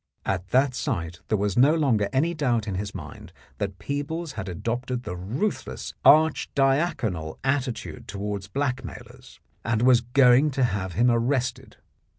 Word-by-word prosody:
At 95 -1 -2
that 130 +4 +2
sight 85 - -3
there 110 - +1
was 100 -1 -1
no 140 +6 +5
longer 120 -10 +2
any 160 +6 +1
doubt 125 -9 0
in 100 - -2
his 100 +2 -4
mind - - -9 0.3
that 100 -2 -3
Peebles 150 - -4
had 105 -6 -6
adopted 120 +7 -3
the 90 - -5
ruth 115 - -2
less 65 -1 -6
archidiaconal 135 - +2
attitude 130 -3 -2
towards 100 -1 -4
blackmailers, 125 0 -5 0.2
and 115 0 0
was 125 -1 +6
going 125 +3 +5
to 135 - +3
have 100 -6 -1
him 120 +7 +3
arrested. 120 +1 -1
120 Hz, 150 wpm, -25 LUFS, 100-135 Hz, 0.3 s, was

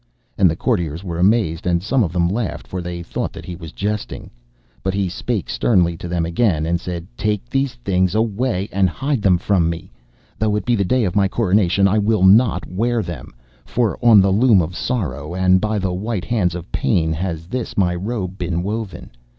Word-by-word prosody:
And 95 -3 +4
the 80 - -1
courtiers 85 - -1
were 85 -3 -4
amazed, 90 -4 +2
and 85 0 +1
some 125 +4 +2
of 90 - -2
them 85 -1 +1
laughed, 105 +3 -3
for 90 - -5
they 85 0 -5
thought - - -3
that - - -9
he 90 - -6
was 80 -3 -9
jesting. 105 +1 -4 0.5
But 95 0 -2
he 100 -1 0
spake 100 +2 -3
sternly 85 - +2
to 85 - -7
them 85 -1 -1
again, 85 -3 +1
and 85 +1 0
said: 85 -2 -5
'Take 105 0 -2
these 135 0 -1
things 95 -4 0
away, 110 -2 0
and 95 -1 +2
hide 135 - -2
them 95 -3 +4
from 90 -2 +1
me. 85 0 -6 0.5
Though 110 -1 +1
it 105 - -2
be 120 - +2
the 100 - +1
day 125 +6 +1
of 95 -4 -1
my 100 -1 +4
coronation, 100 -2 +2
I 105 +2 +2
will 105 -2 +1
not 100 0 +5
wear 115 +4 0
them. 85 -8 -8 0.3
For 115 -4 -1
on 115 -4 +7
the 95 0 +2
loom 110 0 +5
of 85 +1 -2
Sorrow, 85 - -3
and 95 0 +3
by 110 0 0
the 95 -2 -1
white 100 +1 -3
hands 95 -8 0
of 90 +2 -8
Pain, 80 -7 +1
has 80 -1 -4
this 125 +7 -5
my 90 -3 +2
robe 95 0 -4
been 85 -1 -2
woven. 100 -3 -5
95 Hz, 205 wpm, -20 LUFS, 85-110 Hz, 0.5 s, on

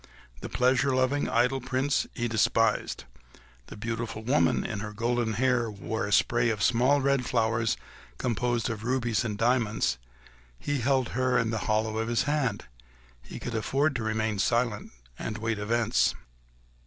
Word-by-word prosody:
The - - -7
pleasure 130 +1 +2
loving, 130 +3 +1
idle 125 +3 +2
Prince 130 +2 0
he 120 -1 -1
despised; 115 0 +1 0.6
the - - -10
beautiful 115 0 -4
woman, 130 +6 +2
who - - -4
in 105 - -3
her 105 +1 -6
golden 120 0 0
hair 120 0 +1
wore 105 +1 -4
a - - -5
spray 120 +3 +3
of 105 -3 -1
small 130 +4 +3
red 140 -1 +2
flowers 115 -1 +1 0.4
composed 120 - -1
of 110 -1 -6
rubies 120 -2 0
and 105 -3 -3
diamonds—her 115 - +1 0.6
he 145 - -2
held 130 0 +1
in 125 -2 +1
the 110 - -3
hollow 110 +1 +1
of 115 - -1
his 115 0 +1
hand: 145 -8 -1 0.6
he - - -9
could 120 - -5
afford 135 +6 0
to 120 - -2
remain 110 -1 -1
silent 115 0 0 0.3
and 110 - -4
to 105 - -7
await 110 -1 -1
events. 115 +2 +1
115 Hz, 160 wpm, -28 LUFS, 110-125 Hz, 0.6 s, spray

